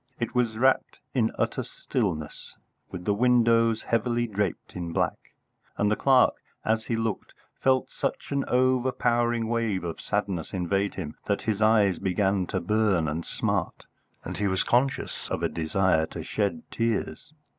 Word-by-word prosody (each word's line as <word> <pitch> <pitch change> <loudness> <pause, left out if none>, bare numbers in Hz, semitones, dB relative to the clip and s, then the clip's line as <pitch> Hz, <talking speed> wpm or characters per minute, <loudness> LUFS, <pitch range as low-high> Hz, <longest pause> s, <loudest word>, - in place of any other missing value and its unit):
It 120 - -2
was 120 -3 +1
wrapped 130 +3 +2 0.2
in 115 -4 +2
utter - - 0
stillness, 75 -2 -4 0.3
with 90 -2 -8
windows 115 0 +3
heavily 120 0 0
draped 105 -5 -3
in 85 -2 -4
black, - - -2 0.4
and 105 0 +2
the - - +3
clerk, 130 0 +4 0.3
as 110 0 +1
he 115 - -1
looked, 115 -3 -3 0.2
felt 130 0 +2
such - - -3
an 140 -1 +1
overpowering 120 -2 +2
wave 115 -5 0
of 85 -2 -5
sadness 100 -5 -2
invade 95 +2 0
him 80 -5 -6
that 100 - 0
his 110 -2 -1
eyes 105 -5 +4
began 95 0 +1
to - - -1
burn 100 -4 +1
and 80 +3 -3
smart, - - -2 0.4
and - - -5
he 105 - 0
was 95 -1 +1
conscious 130 +3 0
of - - -2
a - - +3
desire 80 0 +1
to - - -7
shed 105 +3 -1
tears. 115 +5 -2
110 Hz, 155 wpm, -27 LUFS, 95-120 Hz, 0.4 s, clerk